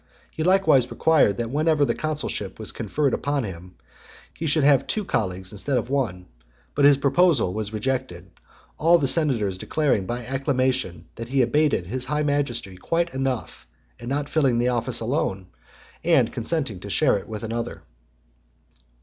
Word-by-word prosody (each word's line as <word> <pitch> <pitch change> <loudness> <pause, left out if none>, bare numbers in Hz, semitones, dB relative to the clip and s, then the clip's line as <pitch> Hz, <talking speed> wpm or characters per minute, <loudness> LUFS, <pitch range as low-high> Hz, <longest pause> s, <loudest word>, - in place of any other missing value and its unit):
He - - -6
likewise 160 -8 +4
required 145 -11 +3
that 115 0 -3
whenever 155 0 +2
the - - 0
consulship 150 -10 -3
was 110 - -4
conferred 135 +6 -1
on 145 -2 +1
him, 90 -2 -8 0.6
he 160 - -4
should 150 0 +2
have 140 -2 +4
two 215 -2 -2
colleagues 95 - -2
instead 125 +6 -1
of 120 +2 -3
one; 110 -10 -1 0.5
but 140 - +3
his 145 -1 +7
proposal 150 - +3
(101) 90 - -6
was 110 -1 -3
rejected, 110 -6 -3 0.5
all 170 +2 +5
the 145 - 0
senators 125 - +1
declaring 135 -11 0
by 120 +1 -4
acclamation 130 - -1
that 115 0 -6
he 135 -1 +3
abated 145 - +1
his 125 +7 -3
high 150 0 -1
majesty 135 -10 -2
quite 170 - -1
enough 130 -2 -3 0.3
in 120 - -7
not 145 +1 -1
filling 135 -7 +2
the 120 +1 +2
office 120 0 -1
alone, 110 - -2 0.5
and - - +3
consenting 120 - -2
to 100 - -9
share 135 +1 +3
it - - -13
with 110 0 -6
another. 115 +1 -4
130 Hz, 165 wpm, -24 LUFS, 110-145 Hz, 0.6 s, his